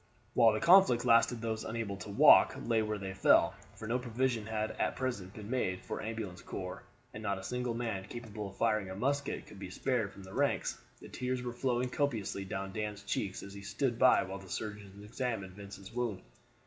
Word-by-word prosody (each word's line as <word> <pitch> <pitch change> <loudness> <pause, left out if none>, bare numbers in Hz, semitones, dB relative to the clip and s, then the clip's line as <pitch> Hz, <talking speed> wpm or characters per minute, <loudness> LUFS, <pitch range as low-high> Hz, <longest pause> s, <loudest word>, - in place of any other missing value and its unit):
While 115 -3 +6
the 110 - 0
conflict 170 -9 +6
lasted 115 0 +4
those 110 -1 -2
unable 115 -3 -3
to 100 - -8
walk 100 - +7
lay 115 -1 +2
where 105 -1 -1
they 95 -1 -5
fell, 95 - +5 0.2
for 110 +2 -7
no 120 +3 +1
provision 120 -2 -1
had 110 -1 -1
at - - +1
present 105 -7 -3
been 105 -2 -8
made 95 -8 0
for - - -4
ambulance 110 -5 -5
corps, 90 -1 -6 0.3
and 105 - -7
not 100 -2 -1
a 95 - -8
single 125 +2 -2
man 110 -5 -3
capable 105 -2 -6
of 95 - -15
firing 110 -4 +1
a 95 - -5
musket 140 +6 -1
could 100 - -13
be 95 - -6
spared 115 0 -1
from 100 - -12
the 95 0 -11
ranks. - - 0 0.2
The - - -10
tears 125 0 -3
were 120 -1 -4
flowing 125 0 0
copiously 110 -9 -1
down 95 0 -4
Dan's 105 -2 -4
cheeks 100 -1 -2
as 100 - -9
he 100 - -8
stood 120 +4 -1
by 130 - +6
while 95 +1 -6
the 95 -1 -13
surgeons 105 0 -6
examined 105 -4 -3
Vincent's 100 0 -10
wound. 120 -5 -2
110 Hz, 205 wpm, -33 LUFS, 100-120 Hz, 0.3 s, walk